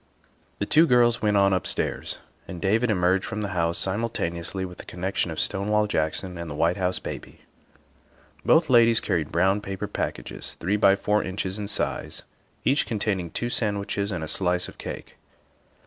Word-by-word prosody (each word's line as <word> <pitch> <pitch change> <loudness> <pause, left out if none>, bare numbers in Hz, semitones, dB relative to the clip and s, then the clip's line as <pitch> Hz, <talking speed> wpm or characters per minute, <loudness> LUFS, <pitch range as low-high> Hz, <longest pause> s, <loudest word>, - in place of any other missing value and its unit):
The 100 - -1
two 160 +9 +5
girls 120 -2 +4
went 105 -1 +2
on 100 -1 +4
upstairs, 95 - -1 0.3
and 90 - -7
David 110 +6 +2
emerged 95 -1 +2
from 105 - -4
the 100 - -2
house 85 -2 +1
simultaneously 95 -3 -1
with 90 -1 -10
the - - -7
connection 90 0 -2
of 80 - -4
Stonewall 105 +2 +1
Jackson 90 0 -2
and 85 -1 -5
the 75 - -5
White 85 +4 +1
House 90 -1 0
Baby. - - -8 1.0
Both 165 +1 +4
ladies 115 -3 +6
carried 80 -4 -1
brown 95 +4 +2
paper 95 -1 -4
packages - - -4
three 95 +5 0
by 100 -2 +5
four 105 +1 +1
inches 95 +1 -3
in 105 - -4
size, 100 - -2 0.4
each 140 +3 +2
containing 100 -5 -1
two 120 +8 -3
sandwiches 100 -2 -1
and 85 -4 -3
a - - -4
slice 90 +1 0
of - - -13
cake. - - -8
95 Hz, 170 wpm, -25 LUFS, 90-105 Hz, 1.0 s, ladies